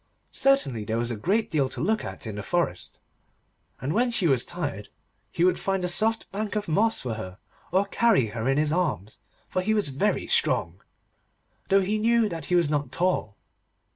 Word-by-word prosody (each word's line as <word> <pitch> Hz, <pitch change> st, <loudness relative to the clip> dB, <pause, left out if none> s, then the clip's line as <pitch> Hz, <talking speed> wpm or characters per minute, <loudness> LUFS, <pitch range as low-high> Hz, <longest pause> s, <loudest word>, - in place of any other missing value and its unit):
Certainly 265 Hz, -, +1 dB
there 110 Hz, +2 st, -1 dB
was 120 Hz, +1 st, 0 dB
a -, -, -2 dB
great 200 Hz, -, 0 dB
deal 140 Hz, -5 st, +1 dB
to -, -, -6 dB
look 215 Hz, +5 st, 0 dB
at -, -, -7 dB
in 110 Hz, -, -5 dB
the 105 Hz, -, -5 dB
forest, 105 Hz, -, -2 dB, 0.8 s
and 140 Hz, +4 st, -2 dB
when 245 Hz, +4 st, +2 dB
she 220 Hz, -6 st, 0 dB
was 135 Hz, -6 st, +3 dB
tired -, -, -5 dB, 0.4 s
he 170 Hz, -, 0 dB
would 185 Hz, -, +3 dB
find 195 Hz, -2 st, -1 dB
a -, -, 0 dB
soft 220 Hz, +5 st, +1 dB
bank 210 Hz, +1 st, -3 dB
of 210 Hz, -1 st, -2 dB
moss 215 Hz, +8 st, +1 dB
for 125 Hz, -3 st, -3 dB
her, 95 Hz, -4 st, -7 dB, 0.3 s
or 190 Hz, +3 st, +3 dB
carry 215 Hz, -, +3 dB
her 115 Hz, +2 st, -1 dB
in 135 Hz, -, +2 dB
his 150 Hz, 0 st, +2 dB
arms, 155 Hz, -, -2 dB, 0.3 s
for 185 Hz, -, -1 dB
he 215 Hz, +4 st, +1 dB
was 205 Hz, -8 st, +1 dB
very 145 Hz, +11 st, 0 dB
strong, -, -, +1 dB, 0.9 s
though 195 Hz, 0 st, +5 dB
he 210 Hz, +3 st, 0 dB
knew 230 Hz, 0 st, +3 dB
that 165 Hz, -6 st, -5 dB
he 180 Hz, -, +1 dB
was 170 Hz, -3 st, +4 dB
not 145 Hz, -3 st, -1 dB
tall. 175 Hz, -, -1 dB
175 Hz, 200 wpm, -26 LUFS, 130-210 Hz, 0.9 s, though